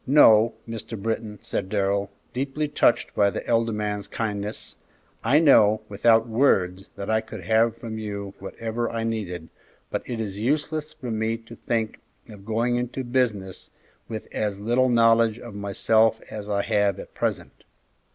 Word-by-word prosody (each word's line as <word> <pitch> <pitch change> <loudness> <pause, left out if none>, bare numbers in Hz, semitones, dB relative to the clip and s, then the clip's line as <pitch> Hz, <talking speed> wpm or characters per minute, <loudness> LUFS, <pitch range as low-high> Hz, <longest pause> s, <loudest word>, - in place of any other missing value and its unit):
"No, 115 -5 +6
Mr. 115 -1 -6
Britton," 110 0 -3
said 95 - -3
Darrell, 100 -1 0 0.2
deeply 140 +4 -1
touched 145 -4 +2
by 100 -1 +4
the - - -5
elder 115 -1 +2
man's 105 -1 -3
kindness; 105 -2 -4 0.5
"I 130 +6 +4
know, 110 -9 +6
without 115 +3 +4
words, 95 -6 +2
that 100 - -6
I 110 0 +2
could 110 -3 -9
have 110 +3 +2
from 110 -2 -6
you 100 -2 -5
whatever 115 +4 -3
I 115 -1 -3
needed, 95 -7 -3 0.4
but - - -1
it 120 -2 -4
is 100 -3 -4
useless 150 +5 -1
for 145 -6 -7
me 110 +1 0
to 115 0 -13
think 115 -3 -2 0.3
of 100 -2 -12
going 120 +2 +1
into 125 +2 -3
business 115 -7 -1 0.4
with 110 -2 -5
as 105 -2 -2
little 120 +5 +2
knowledge 115 -1 +4
of 120 -3 -10
myself 110 +3 +2
as 105 -1 -6
I 100 -1 +1
have 100 -2 +1
at - - -10
present. - - -3
110 Hz, 160 wpm, -25 LUFS, 105-115 Hz, 0.5 s, No